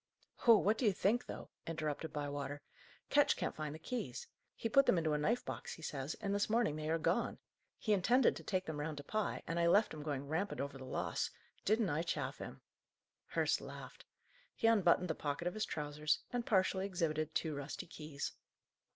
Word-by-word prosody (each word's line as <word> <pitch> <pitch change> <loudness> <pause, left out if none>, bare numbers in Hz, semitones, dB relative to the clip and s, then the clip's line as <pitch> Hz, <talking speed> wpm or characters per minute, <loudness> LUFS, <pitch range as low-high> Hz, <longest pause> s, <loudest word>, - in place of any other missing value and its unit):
"Oh, 230 -2 +10
what 210 +2 +2
do 255 - +1
you 205 - +5
think, 220 +7 +1
though!" - - -7 0.2
interrupted 155 -1 -2
Bywater. 145 0 -3 0.5
"Ketch - - +5
can't - - -2
find 155 -1 -4
the - - -6
keys. 160 - -4 0.3
He - - -2
put 275 +5 +5
them - - +5
into 160 -2 +1
a - - +2
knife 230 +11 +1
box, - - -5
he 165 - -13
says, 140 -1 -3
and 200 -2 -1
this 205 +1 +1
morning 225 -8 +2
they 155 0 -3
are 165 - +3
gone. 165 - +1 0.4
He 215 - +1
intended 240 +6 +4
to - - -8
take 185 -2 -1
them 155 -2 -4
round 150 0 -3
to 145 - -6
Pye, 215 +5 -1
and 165 +1 -1
I 170 - +4
left 205 +5 +5
him 155 - -6
going 145 -2 -3
rampant 175 +7 -1
over 140 -1 -3
the 130 - -7
loss. - - -1 0.4
Didn't 215 -1 +3
I 150 +2 +1
chaff 170 - -2
him?" - - -7 0.7
Hurst - - +1
laughed. - - -9 0.5
He - - -2
unbuttoned 185 -5 +5
the 160 - 0
pocket 145 +3 -2
of 180 - -1
his 215 0 -1
trousers, 150 0 0 0.2
and 240 -1 -1
partially 190 -1 +2
exhibited 155 -4 -1
two 160 -2 0
rusty 145 0 -5
keys. 150 -4 -5
165 Hz, 205 wpm, -36 LUFS, 150-205 Hz, 0.7 s, Oh